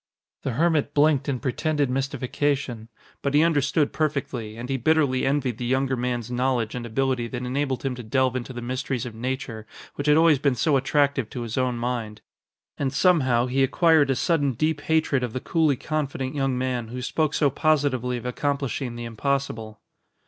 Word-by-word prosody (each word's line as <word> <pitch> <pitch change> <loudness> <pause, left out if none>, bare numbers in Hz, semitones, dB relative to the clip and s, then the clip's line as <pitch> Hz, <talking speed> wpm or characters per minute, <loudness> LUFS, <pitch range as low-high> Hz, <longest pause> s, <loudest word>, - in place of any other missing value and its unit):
The 135 - -2
hermit 155 0 +1
blinked 145 -1 +3
in 130 -3 -1
pretended 145 +2 0
mystification. 135 -3 -2 0.3
But 140 0 0
he 150 - +6
understood 145 -2 +2
perfectly, 130 -8 -2
and 120 +2 -6
he 135 - -1
bitterly 135 -1 +2
envied 135 -4 0
the 120 - -3
younger 130 +1 +1
man's 120 -1 -2
knowledge 125 -3 0
and 120 -1 -5
ability 130 0 0
that 125 +1 -5
enabled 135 +1 -1
him 135 -2 -1
to 125 - -7
delve 130 +2 +1
into 130 +1 -4
the 120 -1 -6
mysteries 130 0 -3
of 120 - -6
nature 120 -2 -4 0.3
which 145 - -4
had 150 +1 +6
always 160 -3 +5
been 140 -2 +2
so 145 +5 +2
attractive 140 -2 +1
to 125 - -6
his 115 -1 -5
own 130 -2 0
mind. 115 -3 -3 0.6
And 135 -2 0
somehow, 130 -11 +3
he 130 +2 0
acquired 155 +1 +4
a 135 - +2
sudden 145 -2 +1
deep 155 +4 0
hatred 160 -4 +1
of 125 -3 -3
the 130 - -2
coolly 155 0 +2
confident 135 -2 -3
young 135 -3 0
man 125 -2 -2
who 125 +2 -6
spoke 155 +3 0
so 145 -3 +3
positively 135 -5 +1
of 120 - -8
accomplishing 135 -1 -2
the 120 0 -6
impossible. 115 -3 -3
130 Hz, 185 wpm, -25 LUFS, 125-145 Hz, 0.6 s, he